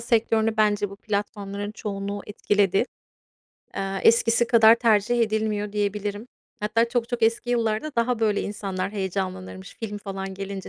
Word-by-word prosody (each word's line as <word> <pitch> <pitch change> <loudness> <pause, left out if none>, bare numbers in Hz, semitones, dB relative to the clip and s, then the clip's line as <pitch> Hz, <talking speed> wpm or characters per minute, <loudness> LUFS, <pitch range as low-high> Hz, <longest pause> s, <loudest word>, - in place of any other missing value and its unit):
sektörünü 225 -1 +1
bence 205 -2 +2
bu 200 - -10
platformların 205 -1 -4
çoğunluğu 200 -1 -4
etkiledi. 205 -1 +1 0.9
Eee, 195 0 -2
eskisi 230 +1 +4
kadar 225 -2 +7
tercih 235 0 +2
edilmiyor, 215 -2 0
diyebilirim. 205 +1 -2 0.3
Hatta 230 +3 +1
çok 235 -1 -1
çok 245 -2 -3
eski 230 +2 +2
yıllarda 230 +4 0
daha 235 0 +1
böyle 210 -2 +2
insanlar 195 -2 -3
heyecanlanırmış 185 - -4
film 210 -2 -4
falan 195 -1 -6
gelince 195 0 -6
210 Hz, 135 wpm, -25 LUFS, 200-225 Hz, 0.9 s, kadar